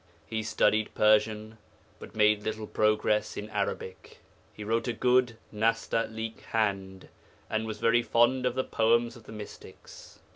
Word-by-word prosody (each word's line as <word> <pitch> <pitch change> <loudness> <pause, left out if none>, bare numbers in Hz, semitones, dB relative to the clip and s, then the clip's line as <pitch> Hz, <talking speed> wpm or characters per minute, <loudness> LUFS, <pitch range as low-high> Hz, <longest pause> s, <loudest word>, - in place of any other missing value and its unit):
He 110 +6 -3
studied 110 0 +1
Persian, 110 +1 +2 0.4
but - - -12
made 105 -1 +4
little 110 +1 -4
progress 105 0 +1
in 105 +1 -6
Arabic. 100 -2 -4 0.3
He 105 - -9
wrote 115 +4 -1
a 120 - 0
good 125 0 +2 0.2
nasta'lik 115 0 -1
hand, 95 -4 -2 0.4
and 110 0 -1
was 110 -1 -5
very 115 +2 +3
fond 120 +2 +2
of 125 - -2
the 130 - 0
poems 115 +1 +1
of 115 -3 -15
the - - -11
mystics.' 105 -1 -11
110 Hz, 145 wpm, -28 LUFS, 105-115 Hz, 0.4 s, made